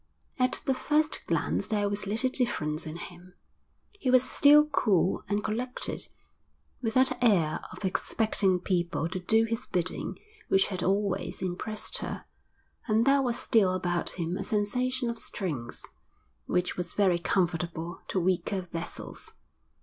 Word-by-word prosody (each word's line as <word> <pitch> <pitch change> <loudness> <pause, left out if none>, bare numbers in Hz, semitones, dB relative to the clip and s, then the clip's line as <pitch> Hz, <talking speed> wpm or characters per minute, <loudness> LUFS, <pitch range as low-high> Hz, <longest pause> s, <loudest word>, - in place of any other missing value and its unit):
At 255 0 +1
the 270 - +2
first 300 +4 0
glance 200 - 0
there 210 -2 +1
was 200 0 -2
little 225 +6 +1
difference 160 - -1
in 155 - -6
him. 180 +1 -11 0.6
He 400 -11 -3
was 255 0 +6
still 295 +1 +7
cool 200 - +1
and 205 +1 0
collected, 245 +4 -3 0.7
with 225 -3 -2
that 255 -1 +3
air 175 -10 +3
of - - -7
expecting 190 -1 +1
people 175 -3 -1
to 185 +2 -4
do 220 +5 +3
his 225 +1 -4
bidding 180 0 -2 0.3
which 195 0 +3
had 185 -3 -3
always 195 +1 -1
impressed 190 +4 -2
her; - - -5 0.6
and 220 +1 +3
there 275 0 +5
was 245 -3 +1
still 195 -5 +3
about 175 -2 -1
him 175 +1 -3
a - - -3
sensation 250 +4 0
of 235 -1 -3
strength, 150 - -4 0.6
which 180 0 0
was 180 -1 -4
very 185 -4 +3
comfortable 170 -2 -1
to 190 - 0
weaker 185 +2 0
vessels. 165 0 -7
200 Hz, 145 wpm, -28 LUFS, 180-235 Hz, 0.7 s, still